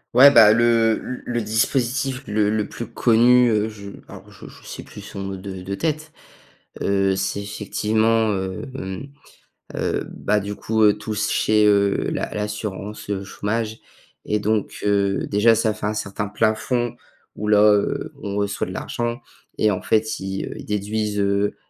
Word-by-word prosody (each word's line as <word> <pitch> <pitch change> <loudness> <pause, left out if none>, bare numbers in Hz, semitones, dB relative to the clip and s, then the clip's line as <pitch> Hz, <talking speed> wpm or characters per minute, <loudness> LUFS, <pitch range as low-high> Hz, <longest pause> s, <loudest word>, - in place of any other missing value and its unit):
Ouais, 140 +3 +9
bah, 110 -5 +8
le 115 -1 +3
le 125 - -6
le 120 -1 -1
dispositif 130 +5 0
le 105 0 +1
le 105 -1 0
plus 115 - -7
connu, 120 +1 +4
heu, 110 0 +1
je 100 -2 -10 0.2
alors, - - -12
je - - -12
je - - -15
sais - - -7
plus - - -12
son - - -9
nom 95 0 -4
de 95 -1 -7
de 95 +2 -4
tête. 155 +3 -2 0.7
Heu, 95 -1 +2
c'est 95 +1 -2
effectivement, 110 +2 0
heu, 95 +2 -3
hem, 95 +1 -6 0.7
heu, - - -1
bah, 105 +1 0
du 100 +1 -5
coup 110 -1 +3
tous 105 -1 -3
chez, 105 0 +3
heu, 100 -1 +2
la - - -3
l'assurance, 105 -1 -5
heu, 100 -1 -2
chômage 110 +3 -3 0.5
et 105 - 0
donc, 105 0 -1
heu, 100 -1 +1
déjà 105 +3 +4
ça 110 0 +1
fait 105 - -5
un 105 - -1
certain 105 0 -3
plafond 110 +3 0 0.4
où 105 - -4
là, 105 -1 +5
heu, 100 - -1
on 100 -1 -4
reçoit 100 0 -1
de - - -7
l'argent. 120 +1 -3 0.4
Et 110 - +3
en 95 - -2
fait, 110 0 +1
ils, 95 0 -4
heu, - - -6
ils - - -9
déduisent, 105 0 -2
heu, 100 +1 +1
105 Hz, 170 wpm, -22 LUFS, 100-115 Hz, 0.7 s, Ouais